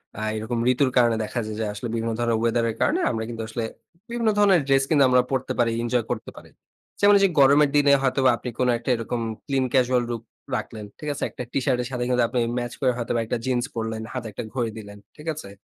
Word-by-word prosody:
অ্যা 110 - -5
এরকম 110 +2 -3
ঋতুর 130 +1 +2
কারণে 120 -2 +4
দেখা 120 +3 -3
যায় 110 - -5
যে 110 - -1
আসলে 120 +4 -5
বিভিন্ন 115 0 -1
ধরনের 115 -1 +1
ওয়েদার 115 0 +1
এর 110 - -4
কারণে 340 +5 +2
আমরা 110 -1 -2
কিন্তু 115 -1 -5
আসলে 115 +1 -4 0.5
বিভিন্ন 235 -1 0
ধরনের 195 -5 +5
ড্রেস 135 0 +4
কিন্তু 145 -4 +5
আমরা 125 0 +5
পরতে 130 -1 -1
পারি, 115 -1 +3
এনজয় 120 -1 0
করতে - - -4
পারি। - - -13 0.5
যেমন 205 0 +6
এইযে 195 0 +4
গরমের 140 +2 +6
দিনে 145 -1 +5
হয়তোবা 130 0 +3
আপনি 125 - -6
কোন 125 - +2
একটা 120 - -6
এরকম 115 +1 -3 0.3
clean 135 -2 0
casual 125 -1 +3
look 115 -1 -4 0.3
রাখলেন। 110 -2 -7
ঠিক 150 - -5
আছে? - - -5
একটা - - -7
টিশার্টের 125 -2 0
সাথে 125 -1 -2
কিন্তু 125 -1 +3
আপনি 125 - -1 0.2
ম্যাচ 120 -1 -3
করে 130 -2 +3
হয়তোবা 120 0 -1
একটা 110 - -2
জিন্স 125 -2 +1
পরলেন, 110 -1 -3
হাতে 120 -3 -4
একটা 100 - -6
ঘড়ি 120 -4 -1
দিলেন। 100 -1 -10 0.2
ঠিক 150 +2 -12
আছে? 145 -10 -9
125 Hz, 225 wpm, -24 LUFS, 115-135 Hz, 0.5 s, যেমন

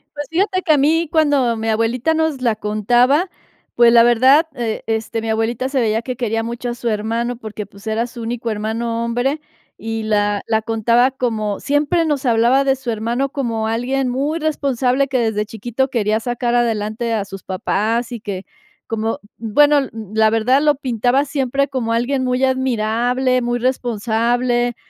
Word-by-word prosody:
Pues, 290 -1 -5
fíjate 370 +3 0
que 320 - +3
a - - +3
mí, 320 +4 +2
cuando 290 -7 +2
mi 220 0 -2
abuelita 230 +7 +1
nos 320 -4 -1
la 235 -3 +1
contaba, 240 - +2 0.5
pues, 235 0 +6
la 235 - +7
verdad, 260 +7 +5
eh, 230 -3 -3
este, 225 0 -2
mi 225 - -4
abuelita 225 +3 -1
se 270 -1 0
veía 225 -2 +1
que 255 +1 -5
quería 225 -2 -1
mucho 235 +1 -4
a - - -2
su 235 0 -3
hermano, 230 +3 -2
porque, 215 -2 -7
pues, 200 +2 -15
era 225 +2 0
su 240 -1 -10
único 230 0 -3
hermano 230 +2 -2
hombre, 245 +6 -1 0.4
y 225 0 -3
la 205 -1 +1
la 220 -1 +1
contaba 230 +3 +2
como, 220 -6 -2
siempre 290 +4 +1
nos 290 -3 -1
hablaba 240 +3 +3
de 270 -1 +3
su 260 -2 -4
hermano 235 +5 -1
como 230 -6 -2
alguien 250 +4 -1
muy 285 +6 -1
responsable, 275 -4 0
que 260 -2 0
desde 220 -2 0
chiquito 240 +5 -2
quería 220 -3 0
sacar 240 +1 -2
adelante 230 -1 0
a 215 -3 0
sus 195 -1 -10
papás 220 +5 -1
y 240 - -5
que 200 -3 -6 0.4
como, 225 0 -2 0.2
bueno, 290 +7 +3
l 275 -2 0 0.2
la 220 0 +4
verdad, 245 +5 +3
lo 295 -1 +3
pintaba 255 0 +1
siempre 275 -1 -1
como 240 -4 -2
alguien 260 +3 0
muy 250 +1 0
admirable, 255 0 +1
muy 240 0 -1
responsable. 240 0 0
240 Hz, 175 wpm, -19 LUFS, 225-265 Hz, 0.5 s, la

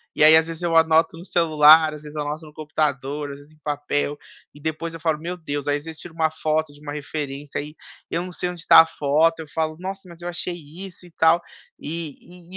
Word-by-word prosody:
e - - +3
aí 155 +1 +9
às 160 0 +2
vezes 165 +1 -6
eu 170 -1 0
anoto 165 0 +4
no 170 - -11
celular, 155 -2 +6
às 150 0 -10
vezes 150 0 -10
eu 150 - -2
anoto 150 +2 -5
no 150 - -14
computador, 145 -2 -2
às 140 - -8
vezes 145 +2 -17
em - - -24
papel, 145 0 -2 0.4
e - - -13
depois 160 +2 -3
eu 165 - -8
falo: 160 -1 0
"Meu 175 +3 -4
Deus", 145 -3 -5
aí 145 - +2
às 145 - -10
vezes 160 -1 -8
tiro 175 -2 -11
uma 160 -1 +1
foto 155 -1 -1
de 145 - -17
uma 145 -1 -6
referência, 145 -1 -5
aí 150 +1 -10 0.3
eu 170 - -1
não 180 - -7
sei 180 - -3
onde 175 -2 -7
está - - +8
a - - +2
foto, 160 +3 +2
eu 160 - -9
falo: 155 -1 -1
"Nossa, 190 +1 -5
mas 170 -1 -13
eu 175 - -4
achei 175 0 -3
isso 175 +4 -11
e 175 - -16
tal", 165 +1 +4 0.4
e 160 -1 -5 0.4
e - - -10
155 Hz, 250 wpm, -23 LUFS, 150-165 Hz, 0.4 s, aí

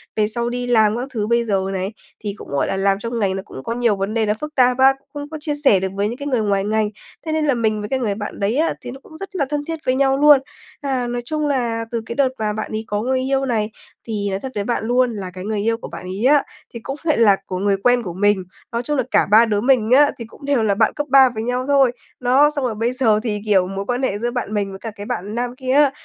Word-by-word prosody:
Về 210 -1 +2
sau 235 +2 -2
đi 245 0 -3
làm 215 +1 +4
các 255 +2 -3
thứ 210 -2 -1
bây 235 0 +2
giờ 195 -3 +1
này, 190 +3 -3 0.3
thì 205 -1 -3
cũng, - - -10
gọi 140 0 0
là, 195 - -2
làm 195 0 +2
trong 230 +1 -3
ngành, 190 -2 +1
nó 195 - -3
cũng 130 - -10
có 230 - -3
nhiều 235 -4 +2
vấn 195 +2 -3
đề 225 -2 +1
là 210 - +2
phức 300 +7 -7
tạp 250 -1 +4
và 265 +1 +6 0.2
không 290 0 -6
có 315 - -6
chia 295 -1 -2
sẻ 200 -8 +5
được 190 - -1
với 200 +1 0
những 240 +3 -5
cái 285 0 -5
người 250 -5 +1
ngoài 200 -2 +1
ngành. 215 0 +1 0.4
Thế 315 - -2
nên 310 -1 +1
là 285 - +3
mình 220 -3 0
với 210 - -5
cái 265 - 0
người 210 -5 -1
bạn 205 0 -6
đấy 205 +5 0
á 325 +2 +2
thì 245 - -7
nó 265 - -10
cũng 315 - -13
rất 390 +1 -9
là 285 -6 +1
thân 295 -1 -1
thiết 325 -1 -4
với 255 0 +2
nhau 270 0 +2
luôn. 295 -1 +7 0.4
À, 260 -3 -1
nói 240 0 -3
chung 305 +2 -1
là, 235 -5 -1
từ 230 -1 -2
cái 235 - -6
đợt 275 -2 +3
mà 210 -1 -1
bạn 215 +1 -5
ấy 215 +1 -3
có 205 0 -1
người 260 +2 0
yêu 270 +1 0
này, 220 -3 -1 0.4
thì 205 -2 -2
nói 190 0 -2
thật 265 +2 -6
với 205 - -1
bạn 235 0 -1
luôn 245 +1 +2
là 185 -3 -5
cái 185 0 -7
người 215 -1 -1
yêu 225 +1 +1
của - - -8
bạn - - -9
ấy 195 +5 -3
á 290 +2 +5 0.3
thì 235 - -6
cũng 270 +5 -6
lại 310 -5 +2
là 210 -4 +6
của 185 - -4
người 200 0 +1
quen 245 -1 +3
của 180 -5 -5
mình. 205 0 +2 0.3
Nói 235 +1 -2
chung 295 +4 -1
là 260 - +2
cả - - +4
ba 225 +2 +7
đứa 210 -2 0
mình 245 -3 +3
á, 285 +3 +6
thì 230 - -7
cũng 255 +5 -14
đều 280 -5 +2
là 205 -2 +2
bạn 220 +1 +2
cấp 295 0 -3
ba 265 -1 +7
với 220 - -3
nhau 250 +2 -1
thôi. 275 -3 +4 0.3
Đó, 260 +4 +4
xong 275 -3 -1
rồi 230 - -2
bây 230 +3 -1
giờ 225 -5 +3
thì, 210 -3 -2
kiểu, 190 -3 +3
mối 195 +1 -4
quan 245 +3 -2
hệ 205 -6 0
giữa 240 +2 -1
bạn 240 -4 -3
mình 205 -2 -1
với 195 0 -9
cả 225 - -6
cái 205 -1 -9
bạn 205 +3 -4
nam 245 +1 -2
kia 260 -1 -3
á, 285 -1 +5
235 Hz, 305 wpm, -20 LUFS, 210-265 Hz, 0.4 s, luôn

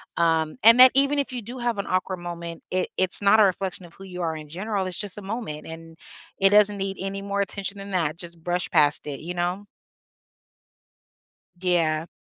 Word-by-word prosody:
um, 165 -2 +1
and 230 +3 +8
that 255 0 +10
even 280 +1 +3
if 270 -2 -2
you 245 - -4
do 245 +5 -8
have 240 -3 -1
an - - -2
awkward 185 0 -1
moment, 170 -1 -7
it 185 0 0
it's 185 +2 +1
not 210 +2 +5
a - - +8
reflection 185 -1 -1
of 170 - -16
who 195 - -12
you 180 -1 -7
are 160 -2 -1
in 155 -1 -10
general, 195 +4 -3
it's 185 - -4
just 205 -1 -5
a - - -6
moment 195 -7 -6
and 165 0 -10 0.4
it 195 0 +4
doesn't 210 0 +5
need 195 0 -3
any 195 +1 -4
more 200 0 -2
attention 200 0 -3
than 200 0 -8
that. 165 -4 0
Just 170 -1 -9
brush 180 +1 -2
past 150 -6 +3
it, 140 -2 -4
you 175 +3 -6
know? 180 +4 -2 1.9
Yeah. 165 -3 +1
185 Hz, 205 wpm, -24 LUFS, 170-200 Hz, 1.9 s, that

